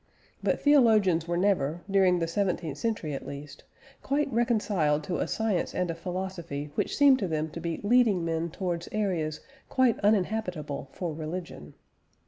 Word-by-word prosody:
But -, -, +1 dB
theologians 215 Hz, -, +4 dB
were 170 Hz, 0 st, 0 dB
never, 175 Hz, -4 st, +1 dB
during 190 Hz, -2 st, +4 dB
the 170 Hz, -, 0 dB
seventeenth 175 Hz, -4 st, -1 dB
century 210 Hz, -10 st, -2 dB
at 135 Hz, -, -6 dB
least, 140 Hz, +1 st, -9 dB, 0.4 s
quite 280 Hz, 0 st, 0 dB
reconciled 205 Hz, -10 st, +1 dB
to 175 Hz, +3 st, -2 dB
a -, -, 0 dB
science 220 Hz, -5 st, -1 dB
and 180 Hz, -2 st, 0 dB
a -, -, -3 dB
philosophy 170 Hz, -4 st, -5 dB
which -, -, -1 dB
seemed 280 Hz, -2 st, +6 dB
to 195 Hz, -, -1 dB
them 155 Hz, -1 st, -2 dB
to 170 Hz, -, -6 dB
be 165 Hz, -1 st, -3 dB
leading 210 Hz, -5 st, +3 dB
men 165 Hz, 0 st, -1 dB
towards 175 Hz, 0 st, -3 dB
areas 175 Hz, -8 st, -1 dB, 0.3 s
quite 255 Hz, -3 st, +2 dB
uninhabitable 185 Hz, -9 st, 0 dB
for 175 Hz, -4 st, -4 dB
religion. 155 Hz, -, -7 dB
180 Hz, 155 wpm, -28 LUFS, 160-210 Hz, 0.4 s, seemed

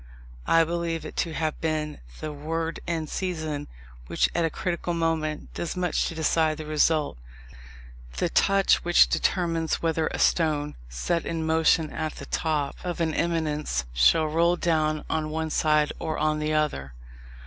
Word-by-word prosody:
I 165 Hz, 0 st, +5 dB
believe 165 Hz, 0 st, -2 dB
it -, -, -8 dB
to 165 Hz, -, -1 dB
have 155 Hz, -1 st, -2 dB
been 155 Hz, -1 st, -2 dB, 0.2 s
the 155 Hz, -, -4 dB
word 160 Hz, +3 st, -3 dB
in 165 Hz, -2 st, -1 dB
season, 155 Hz, -4 st, -3 dB, 0.4 s
which, -, -, +2 dB
at 170 Hz, -, +1 dB
a 165 Hz, -, +2 dB
critical 175 Hz, +1 st, -2 dB
moment, 160 Hz, -2 st, -1 dB
does 170 Hz, +1 st, -4 dB
much 180 Hz, -1 st, 0 dB
to 165 Hz, -, -5 dB
decide 160 Hz, -1 st, +1 dB
the 155 Hz, -, -6 dB
result; 155 Hz, -, +1 dB, 1.0 s
the -, -, +1 dB
touch 195 Hz, -1 st, +3 dB
which 175 Hz, 0 st, +5 dB
determines 165 Hz, -3 st, 0 dB
whether 160 Hz, -1 st, +1 dB
a -, -, -3 dB
stone, 150 Hz, -3 st, +2 dB, 0.2 s
set 160 Hz, -, -1 dB
in 165 Hz, -1 st, -3 dB
motion 160 Hz, -1 st, +3 dB
at 155 Hz, -1 st, -3 dB
the -, -, -8 dB
top 150 Hz, -3 st, -1 dB
of 175 Hz, -1 st, -3 dB
an 160 Hz, -2 st, 0 dB
eminence, 150 Hz, -, -1 dB
shall -, -, +4 dB
roll 170 Hz, +3 st, +2 dB
down 155 Hz, -3 st, 0 dB
on 155 Hz, -1 st, -1 dB
one 160 Hz, 0 st, -2 dB
side 150 Hz, -1 st, +2 dB
or 155 Hz, -, -3 dB
on 155 Hz, 0 st, +1 dB
the 150 Hz, 0 st, -1 dB
other. 150 Hz, -, -1 dB
160 Hz, 160 wpm, -26 LUFS, 155-165 Hz, 1.0 s, I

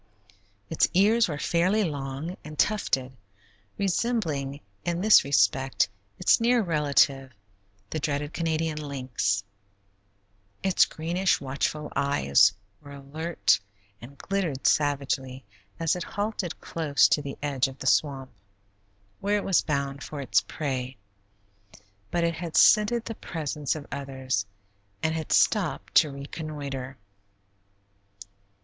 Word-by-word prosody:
Its 160 Hz, -, +2 dB
ears 215 Hz, +5 st, +4 dB
were 150 Hz, -4 st, -4 dB
fairly 180 Hz, +7 st, +1 dB
long 145 Hz, +1 st, -4 dB
and 150 Hz, 0 st, -9 dB
tufted, 135 Hz, -12 st, +1 dB, 0.7 s
resembling 175 Hz, -, -1 dB, 0.2 s
in 170 Hz, 0 st, -1 dB
this 215 Hz, +3 st, +6 dB
respect 135 Hz, -1 st, +2 dB, 0.3 s
its -, -, +3 dB
near 240 Hz, +1 st, +4 dB
relative, 140 Hz, -5 st, +2 dB, 0.6 s
the 155 Hz, -, -2 dB
dreaded 145 Hz, 0 st, -2 dB
Canadian 160 Hz, -2 st, -1 dB
lynx; 130 Hz, -8 st, -2 dB, 1.2 s
its 190 Hz, -2 st, +4 dB
greenish, 175 Hz, +4 st, 0 dB
watchful 140 Hz, +3 st, -3 dB
eyes 75 Hz, -, +4 dB, 0.3 s
were 145 Hz, -1 st, -12 dB
alert 155 Hz, +5 st, 0 dB, 0.4 s
and 135 Hz, +4 st, -12 dB
glittered 175 Hz, -9 st, -3 dB
savagely 135 Hz, -3 st, 0 dB, 0.3 s
as 165 Hz, 0 st, +1 dB
it 180 Hz, -, -4 dB
halted 205 Hz, -4 st, -3 dB
close 155 Hz, -4 st, +2 dB
to 150 Hz, -, +2 dB
the 140 Hz, -1 st, -7 dB
edge 140 Hz, -2 st, +1 dB
of 135 Hz, 0 st, -10 dB
the -, -, -8 dB
swamp, 135 Hz, -1 st, +1 dB, 0.9 s
where 205 Hz, +1 st, +1 dB
it 205 Hz, -, -3 dB
was 190 Hz, -, +3 dB
bound 140 Hz, -2 st, -2 dB
for 150 Hz, -, -7 dB
its 135 Hz, -3 st, +2 dB
prey, 130 Hz, -4 st, -4 dB, 1.1 s
but 175 Hz, -, 0 dB
it 170 Hz, 0 st, +1 dB
had 165 Hz, -1 st, -4 dB
scented 220 Hz, +2 st, +5 dB
the 225 Hz, -, -4 dB
presence 150 Hz, -7 st, -3 dB
of 150 Hz, -2 st, -7 dB
others, 130 Hz, -7 st, -3 dB, 0.6 s
and 160 Hz, -, +1 dB
had 160 Hz, -2 st, -4 dB
stopped 180 Hz, -10 st, +2 dB
to 155 Hz, -, +5 dB
reconnoiter. 140 Hz, -2 st, -6 dB
150 Hz, 120 wpm, -26 LUFS, 135-170 Hz, 1.2 s, this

